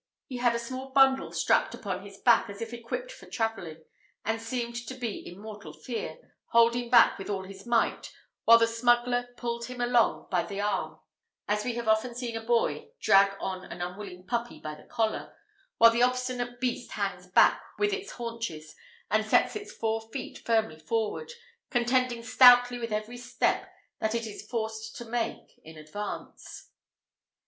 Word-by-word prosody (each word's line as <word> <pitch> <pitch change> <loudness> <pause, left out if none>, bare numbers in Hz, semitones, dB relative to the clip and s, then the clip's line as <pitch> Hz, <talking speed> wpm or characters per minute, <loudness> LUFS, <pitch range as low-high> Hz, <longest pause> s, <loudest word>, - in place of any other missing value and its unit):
He 255 - -6
had 240 -1 +2
a - - +1
small 255 +3 -6
bundle 270 0 +4
strapped - - +2
upon 190 -3 -4
his 200 -1 -11
back, 230 -1 +4
as 200 0 -8
if 230 +1 -5
equipped 240 - -5
for - - -13
travelling; 195 -9 -3 0.4
and 225 +1 -1
seemed 235 0 -3
to 260 - -5
be 240 -5 -4
in 175 +2 -11
mortal 205 -7 -9
fear, 225 - -5 0.3
holding 235 +1 +3
back 235 -4 +6
with 195 - -7
all 195 -2 -2
his 195 +2 -11
might, 235 -1 +1 0.3
while 230 +1 +9
the 230 - +4
smuggler 240 +1 +2
pulled 235 0 -3
him 250 0 -8
along 240 -1 +2
by 180 -2 +3
the 200 -1 -6
arm, 205 0 -2 0.5
as 210 0 0
we 240 0 -2
often 235 +1 +1
see 240 -1 -4
a 225 - -4
boy 240 - 0
drag 195 0 +5
on 185 -1 -4
an 175 - -9
unwilling 180 +1 -6
puppy 235 +2 -3
by 155 - -6
the 150 - -14
collar, 220 -1 -2 0.4
while 230 0 +8
the 235 +1 +1
obstinate 250 -1 0
beast 250 -1 -2
hangs - - -3
back - - +5 0.2
with 415 0 +1
its 405 0 -5
haunches, 230 -11 -6 0.4
and 215 +1 +3
sets 215 - +3
its 415 -1 -6
four 225 0 -2
feet 255 +3 -6
firmly 220 -9 0
forward, 225 - -2 0.4
contending 245 -1 +1
stoutly 245 +1 +7
every 215 +2 -4
step 245 - -1 0.3
that 220 +1 0
it 230 0 -1
is 210 -1 -9
forced 220 -2 -4
to 240 - -7
make 230 0 -4
in 160 0 -12
advance. 155 +7 -8
230 Hz, 170 wpm, -28 LUFS, 210-245 Hz, 0.5 s, while